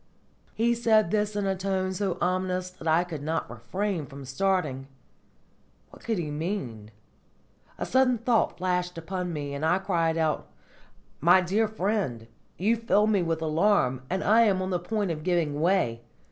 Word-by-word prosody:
He 235 +2 +2
said 220 -5 +3
this 210 -1 0
in 205 -1 -1
a 195 0 +1
tone 190 0 -1
so 190 -1 -2
ominous 185 0 -1
that 180 -3 -9
I 160 +2 +4
could 165 -5 -7
not 160 +3 -2
refrain 160 - -3
from 140 +1 -10
starting. 140 -2 -1 1.0
What - - -16
could 225 -2 -1
he 155 -4 -3
mean? 145 - -4 0.9
A - - -3
sudden 260 -1 +3
thought 230 0 +1
flashed 180 -1 -1
upon 180 +2 -4
me, 145 -3 -4
and 140 +2 -5
I 165 +3 +3
cried 170 -4 0
aloud: 155 -2 0 0.7
"My 175 +5 +6
dear 200 +5 +1
friend, 195 - -2 0.3
you 220 +6 +2
fill 220 -2 +2
me 210 -3 +2
with 165 -1 -1
alarm, 155 -5 +2
and 190 +2 -1
I 220 +3 +5
am 200 -5 +3
on 185 - -3
the 180 - 0
point 200 +1 -2
of 155 -1 -4
giving 155 -4 0
way! 165 -10 +1
180 Hz, 170 wpm, -27 LUFS, 160-205 Hz, 1.0 s, My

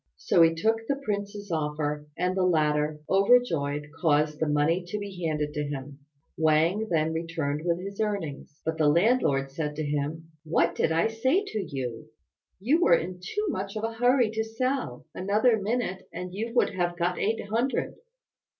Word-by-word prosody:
So 170 - +3
he 165 0 +5
took 225 +6 0
the 280 - +1
prince's 205 -6 -4
offer, 150 -1 -2
and 180 +1 0
the 190 - +1
latter, 150 -3 +1
overjoyed, 165 -9 +2
caused 150 -2 +2
the 160 - +1
money 150 +4 +2
to 210 - -3
be 200 -3 -6
handed 150 -2 -1
to 150 - -2
him. 140 -1 -6 0.4
Wang 160 +7 +2
then 160 -1 +1
returned 160 -3 -2
with 170 0 0
his 200 +3 -5
earnings; 165 -9 -3
but 160 0 -2
the 155 - +4
landlord 160 - +2
said 150 0 -3
to 155 - -2
him, 150 +3 -3
"What 165 +1 +2
did - - +1
I 165 +5 +2
say 260 - +1
to 215 - -3
you? 130 -9 -5 0.5
You 275 - +2
were 170 - +6
in 180 +2 -3
too 415 - -3
much 195 - -3
of 215 - -4
a 225 0 -1
hurry 245 0 +3
to 220 0 -1
sell. 225 - -2
Another 210 +4 +2
minute, 210 -3 -2
and 180 +1 -6
you 225 +4 -3
would - - +3
have 175 -1 -1
got 175 +1 0
eight 220 +1 0
hundred." 235 +5 0
175 Hz, 175 wpm, -27 LUFS, 150-215 Hz, 0.5 s, were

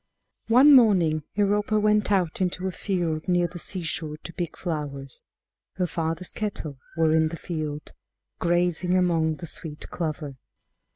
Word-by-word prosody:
One 260 +6 +7
morning 180 - +5
Europa 205 +1 +2
went 210 0 +2
out 185 -3 +1
into 180 0 -1
a - - -2
field 170 -5 -2
near 175 -1 +3
the 175 0 -6
seashore 165 -4 -2
to 170 - -8
pick 175 -2 -4
flowers. 145 -5 -5 0.5
Her 180 - 0
father's 165 +1 -2
cattle 160 -10 -4 0.2
were 160 -1 +3
in 160 0 +4
the 165 +1 -6
field, 155 -3 -5 0.5
grazing 175 +1 +1
among 165 -3 +2
the 170 - -8
sweet 150 -1 -4
clover. 155 -5 -4
170 Hz, 140 wpm, -25 LUFS, 155-185 Hz, 0.5 s, One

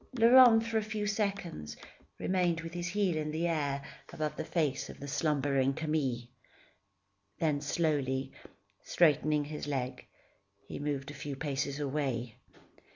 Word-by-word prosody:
Laurent, 235 -1 +8
for 225 -1 +1
a - - -3
few 215 -1 -3
seconds, 195 - -2 0.4
remained 175 -3 +1
with 165 +1 -7
his 175 0 -3
heel 190 -2 +1
in 155 -1 -2
the 160 +3 -1
air, 145 -4 -1 0.3
above 155 -1 -3
the - - -3
face 155 -4 -1
of - - -10
the 140 - -7
slumbering 140 -2 +1
Camille. 150 -6 -1 1.1
Then 150 -3 +1
slowly, 140 -4 0 0.5
straightening 150 -2 +3
his 150 0 -6
leg, 130 -3 -3 0.6
he - - -6
moved 145 -1 -3
a - - -9
few 145 -1 -5
paces 140 0 -2
away. 135 -5 -2
150 Hz, 140 wpm, -31 LUFS, 140-175 Hz, 1.1 s, Laurent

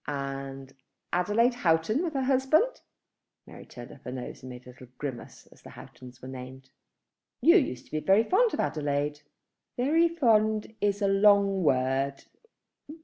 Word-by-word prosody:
"And 135 -1 -6 0.4
Adelaide 210 +8 +2
Houghton 185 - +1
with 325 -4 -4
her 270 - 0
husband." 275 - +2 0.6
Mary - - -13
turned 120 -1 -11
up 140 - -15
her 125 - -6
nose 125 -1 -7
and 130 - -10
made 125 0 -11
a 125 - -12 0.2
grimace 135 -5 -7
as - - -20
the - - -13
Houghtons 125 0 -14
were - - -7
named. 130 0 -10 0.7
"You 335 +4 +6
used 130 - -2
to - - -24
be 155 - -1
very 195 +7 +3
fond 440 - +2
of - - -9
Adelaide." 145 0 -2 0.6
"Very 320 +7 +3
fond 220 -9 +1
is 205 0 0
a - - +3
long 200 -1 +4
word. 135 -1 0
175 Hz, 155 wpm, -27 LUFS, -, 0.7 s, You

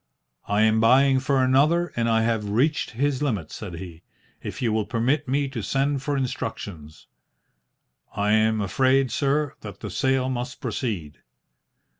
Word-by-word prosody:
"I 105 +1 +2
am 110 0 +3
buying 130 +4 +5
for 135 0 +1
another, 150 +7 +3
and 115 0 0
I 110 0 +3
have 110 -2 -1
reached 135 +8 +1
his 140 0 0
limit," 105 - -2
said 95 -6 -7
he. 85 -2 -9 0.4
"If - - -6
you 115 -3 0
will 110 -1 0
permit 130 +5 0
me 140 +2 0
to 125 -4 -5
send 135 +4 0
for 145 +1 -1
instructions 100 - -5 0.6
" - - -35
"I 105 +1 +1
am 110 0 +3
afraid, 130 +6 +2
sir, 145 +2 0
that 100 -3 -9
the 105 - -6
sale 130 +5 +1
must 125 0 -4
proceed." 90 - -4
120 Hz, 160 wpm, -24 LUFS, 105-135 Hz, 0.6 s, buying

